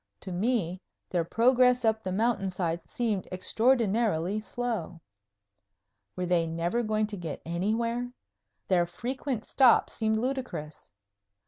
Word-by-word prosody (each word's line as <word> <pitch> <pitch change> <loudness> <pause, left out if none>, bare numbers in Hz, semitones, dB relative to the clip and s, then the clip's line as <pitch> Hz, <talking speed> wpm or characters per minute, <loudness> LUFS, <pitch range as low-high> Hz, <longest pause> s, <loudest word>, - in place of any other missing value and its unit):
To 190 - -5
me 185 -2 0 0.3
their 175 -2 +1
progress 250 +5 +3
up 220 0 +2
the 190 - -3
mountain 215 -1 +1
side 170 -2 -3
seemed 220 -6 -1
extraordinarily 215 -2 +1
slow. 215 -7 -4 1.2
Were 180 - -2
they 175 -2 +2
never 170 +8 -1
going 215 -1 +1
to 210 -1 -6
get 165 -5 -5
anywhere? 230 +8 -1 0.6
Their 175 -2 +3
frequent 245 - -4
stops 255 -4 +4
seemed 220 -1 0
ludicrous. 250 - -4
215 Hz, 120 wpm, -28 LUFS, 175-240 Hz, 1.2 s, stops